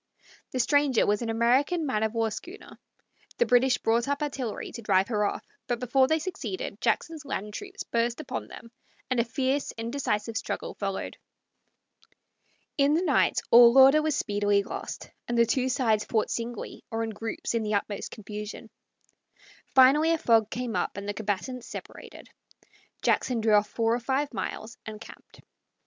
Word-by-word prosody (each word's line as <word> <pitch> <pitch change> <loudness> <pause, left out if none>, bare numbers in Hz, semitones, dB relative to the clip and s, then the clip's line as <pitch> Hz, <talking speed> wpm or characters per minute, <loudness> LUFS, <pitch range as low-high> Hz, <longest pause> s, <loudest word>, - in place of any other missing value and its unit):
The 255 - -3
stranger 285 -1 +3
was 205 +2 +1
an 235 - -3
American 260 +9 +2
man 255 -7 -1
of 220 +1 -1
war 225 -1 +1
schooner. 360 - -10 0.6
The 480 - +3
British 250 - +4
brought 230 +2 +1
up 285 +1 -1
artillery 265 -6 -4
to 235 - -8
drive 195 -2 +2
her 210 -3 +1
off, - - -3 0.2
but 240 -1 -1
before 260 +2 +3
they 315 - +2
succeeded 370 +3 -5
Jackson's 320 -2 -1
land 210 -7 -4
troops 390 - -7
burst 235 +2 -1
upon 310 - -5
them, 230 -1 -12 0.4
and 255 - +2
a - - +4
fierce, 265 +4 -1
indecisive 230 -2 -2
struggle - - -4
followed. 195 -1 -4 1.6
In 280 +2 +4
the 340 - +1
night 295 -7 +2
all 235 +1 +8
order 270 +3 +8
was 310 -2 0
speedily 205 -1 +1
lost, - - -7 0.2
and 240 - -1
the 235 - +6
two 255 +2 0
sides 235 -5 +1
fought 220 -2 -1
singly 235 -1 -5
or 225 0 -2
in 225 - -3
groups 225 +2 -4
in 230 - +1
the 215 -1 -1
utmost 205 0 -3
confusion. 210 +1 -8 1.0
Finally 275 +5 +6
a 330 - +3
fog 225 -8 +3
came 245 -1 -4
up - - -2
and 200 0 -6
the 205 - -2
combatants 220 +4 -3
separated. - - -10 0.8
Jackson 245 -3 +1
drew 220 -1 +2
off 210 0 +4
four 225 +1 +1
or 240 - 0
five 270 +3 -1
miles 220 +2 -5
and 215 -1 -8
camped. 230 - -14
235 Hz, 170 wpm, -27 LUFS, 220-270 Hz, 1.6 s, all